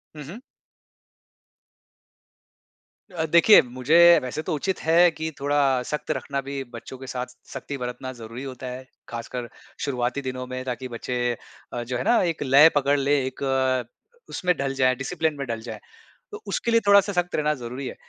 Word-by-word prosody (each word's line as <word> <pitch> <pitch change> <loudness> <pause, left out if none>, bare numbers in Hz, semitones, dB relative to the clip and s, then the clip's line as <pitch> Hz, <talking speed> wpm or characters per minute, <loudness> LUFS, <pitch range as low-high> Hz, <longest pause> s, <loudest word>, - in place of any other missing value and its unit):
हुँ, 150 - -8
हुँ। 175 +11 -9 2.8
अ, 160 -1 0
देखिए 170 +7 +7
मुझे 130 +5 +1 0.3
वैसे 130 +5 -4
तो - - -2
उचित 185 +5 -2
है 170 +2 +5
कि 160 0 -4
थोड़ा 145 +1 0 0.3
सख़्त 150 - -3
रखना 140 -1 -3
भी, 140 0 -5
बच्चों 120 +1 -10
के 130 0 -10
साथ 125 0 -3 0.3
सख़्ती 140 +1 -6
बरतना 125 +1 -5
ज़रूरी 115 +1 -9
होता 130 -1 -7
है। 125 +1 -6 0.3
ख़ासकर 120 +1 -5 0.4
शुरुआती 125 -1 -1
दिनों 130 -1 -5
में 130 0 -5
ताकि 130 0 -4
बच्चे 125 +1 -5 0.6
अ, 120 - -3
जो 125 +1 -3
है 125 - -3
ना 235 +1 +3
एक 170 -4 -1
लय 140 +4 +7
पकड़ 145 0 +3
ले 140 +1 +2
एक 130 +1 -7 0.9
उसमें 180 -1 0
ढल 135 -1 -2
जाए 130 -1 +2
डिसिप्लिन 160 +4 -2
में 140 - -4
ढल 115 -1 -4
जाए। 110 -2 -7 0.5
तो 420 +1 -8
उसके 235 - -1
लिए 230 - +5
थोड़ा-सा 200 0 +5
सख़्त 180 -1 -1
रहना 150 0 +1
ज़रूरी 125 +1 -6
है। - - -7
135 Hz, 175 wpm, -24 LUFS, 125-155 Hz, 2.8 s, देखिए